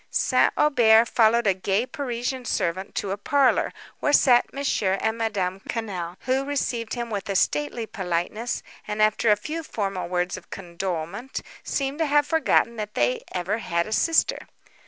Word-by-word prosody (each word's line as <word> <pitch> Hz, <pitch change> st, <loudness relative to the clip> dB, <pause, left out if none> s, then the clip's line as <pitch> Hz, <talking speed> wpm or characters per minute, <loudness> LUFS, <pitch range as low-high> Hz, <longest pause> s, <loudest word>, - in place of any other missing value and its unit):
St. -, -, +3 dB
Aubert 235 Hz, -6 st, +5 dB
followed 230 Hz, 0 st, +3 dB
a 195 Hz, -, +4 dB
gay 195 Hz, +4 st, 0 dB
Parisian 255 Hz, -1 st, -4 dB
servant 185 Hz, -2 st, -2 dB
to 195 Hz, -, -2 dB
a 200 Hz, -, -2 dB
parlour, 275 Hz, +5 st, +2 dB, 0.3 s
where 295 Hz, -, +1 dB
sat 245 Hz, -4 st, +5 dB
Mons. 280 Hz, 0 st, -1 dB
and 195 Hz, +3 st, +1 dB
Madame 195 Hz, -5 st, -2 dB
Quesnel, 185 Hz, -6 st, -4 dB
who 260 Hz, +1 st, 0 dB
received 255 Hz, -5 st, -2 dB
him 235 Hz, -1 st, -4 dB
with 200 Hz, -1 st, -4 dB
a 195 Hz, -, -1 dB
stately 150 Hz, +7 st, 0 dB
politeness, 190 Hz, +4 st, -3 dB, 0.2 s
and, 210 Hz, 0 st, -4 dB
after 215 Hz, +1 st, +3 dB
a 210 Hz, -, +6 dB
few 305 Hz, +10 st, -5 dB
formal 195 Hz, -, -3 dB
words 180 Hz, 0 st, -1 dB
of 185 Hz, -, -14 dB
condolement, 180 Hz, +5 st, -5 dB, 0.2 s
seemed 275 Hz, +2 st, -2 dB
to 320 Hz, -, +2 dB
have 290 Hz, 0 st, +3 dB
forgotten 295 Hz, -7 st, +2 dB
that 210 Hz, -1 st, -5 dB
they 125 Hz, +1 st, +1 dB
ever 190 Hz, +5 st, -2 dB
had 170 Hz, -5 st, -1 dB
a -, -, -8 dB
sister. 325 Hz, +7 st, +2 dB
220 Hz, 165 wpm, -24 LUFS, 185-250 Hz, 0.3 s, a